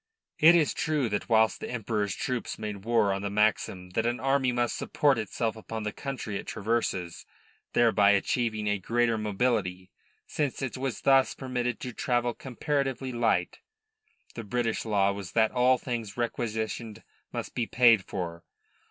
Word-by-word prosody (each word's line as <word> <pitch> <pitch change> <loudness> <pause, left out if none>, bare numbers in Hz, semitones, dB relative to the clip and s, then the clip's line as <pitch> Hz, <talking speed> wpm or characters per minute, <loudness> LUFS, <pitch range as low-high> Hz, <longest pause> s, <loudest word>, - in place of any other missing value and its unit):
It 165 +3 +8
is 160 -4 +3
true 155 -8 0
that 105 +3 -3
whilst 110 -1 +3
the - - -6
Emperor's 105 -4 -2
troops 125 -2 -3
made 105 -2 -6
war 115 -4 +3
on 100 - -3
the 100 - -2
maxim 100 -3 0
that 115 +5 0
an 120 +1 -1
army 135 -1 +2
must 120 -1 0
support 140 -5 +1
itself 110 +1 -2
upon 110 0 -6
the 105 - -2
country 130 -7 -4
it - - -8
traverses, 100 -6 -2 0.5
thereby 110 -4 +4
achieving 110 +2 +1
a 105 -1 +1
greater 115 +4 +1
mobility, 105 -4 -1 0.3
since 145 -4 -2
it 130 - -3
was 130 -2 -3
thus 135 -1 +4
permitted 125 -3 -2
to 125 - -5
travel 120 0 0
comparatively 135 0 -2
light, 120 -2 0 0.7
the 115 - -6
British 115 +2 -1
law 100 -3 +2
was 100 -2 -7
that 110 -1 +3
all 125 0 +4
things 115 -5 -5
requisitioned 110 -2 -3 0.3
must - - -5
be 120 -2 -1
paid 115 -5 +5
for. 85 -4 -5
115 Hz, 160 wpm, -28 LUFS, 105-125 Hz, 0.7 s, It